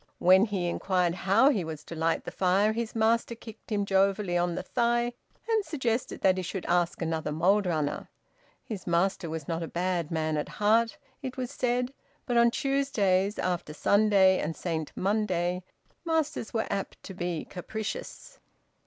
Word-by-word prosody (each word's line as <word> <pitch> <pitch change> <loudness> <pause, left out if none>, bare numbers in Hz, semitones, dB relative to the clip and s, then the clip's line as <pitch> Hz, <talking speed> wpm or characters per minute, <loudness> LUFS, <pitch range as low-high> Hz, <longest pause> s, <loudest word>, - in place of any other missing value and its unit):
When 185 +3 +6
he 200 -5 -2
inquired 180 0 +1
how 200 +10 +4
he 205 -10 0
was 160 -1 -6
to - - -9
light 165 +1 0
the - - -6
fire 195 +3 +2
his 230 0 -3
master 230 +1 +2
kicked 225 -1 -13
him 205 -1 +1
jovially 195 -1 +2
on 175 0 +1
the - - -3
thigh 240 0 +1 0.3
and 445 -2 +2
suggested 260 - -2
that 190 -1 +4
he - - -1
should 185 +1 -5
ask 175 -1 +1
another 160 -2 -2
mould 185 +6 +2
runner. 155 -4 -2 0.5
His 205 -5 -7
master 175 0 +1
was 160 -2 -5
not 165 0 -2
a 165 - -3
bad 175 -2 -1
man 155 -2 -1
at 150 - -3
heart, 225 +2 +3 0.2
it 260 -2 -6
was 255 0 -3
said, 250 -1 -1 0.3
but 245 - -1
on 235 0 +6
Tuesdays, 220 -8 +1
after 175 -4 -2
Sunday, 200 -1 +4
and 160 +1 -2
Saint 160 -3 -3
Monday, 185 -3 0 0.4
masters 320 -8 -1
were 225 - 0
apt 195 -1 -4
to 190 - -8
be 175 -3 -3
capricious. 215 +4 -6
195 Hz, 170 wpm, -28 LUFS, 175-230 Hz, 0.5 s, When